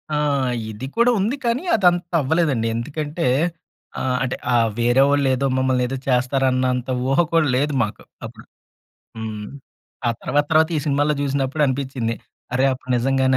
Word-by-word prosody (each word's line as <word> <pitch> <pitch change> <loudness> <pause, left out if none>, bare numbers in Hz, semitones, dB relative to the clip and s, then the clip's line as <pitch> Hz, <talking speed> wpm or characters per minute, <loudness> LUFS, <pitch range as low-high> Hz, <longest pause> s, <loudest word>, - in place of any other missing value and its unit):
ఆ! - - +1 0.5
ఇది 110 +5 -7
కూడా 240 +1 +5
ఉంది 220 +8 0
కానీ 235 +6 0
అదంతా 175 -4 +2
అవ్వలేదండి 140 -5 +1
ఎందుకంటే 150 +7 -3 0.7
ఆహ్, 130 -1 0
అంటే 130 - -2 0.2
ఆ - - +4 0.2
వేరే 120 +3 +3
వాళ్ళు 140 -1 +2
ఏదో 140 - -1
మమ్మల్ని 130 -1 +1
ఏదో 135 +1 -4
చేస్తారు 130 +1 +1
అన్నంత 125 0 0 0.2
ఊహ 135 +3 +2
కూడా 165 -3 +4
లేదు 145 +2 0
మాకు 105 - -5 0.2
అప్పుడు. - - -11 0.7
హ్మ్. 110 -1 -5 0.6
ఆ - - +3
తర్వాత, 145 0 +1
తర్వాత 160 0 +4
ఈ - - +2
సినిమాలో 145 +1 +2
చూసినప్పుడు 140 +1 -1
అనిపించింది 130 -3 -2 0.4
అరె 130 +2 +3
అప్పుడు 130 0 -8
నిజంగానే 130 +1 +2
135 Hz, 155 wpm, -21 LUFS, 125-150 Hz, 0.7 s, కూడా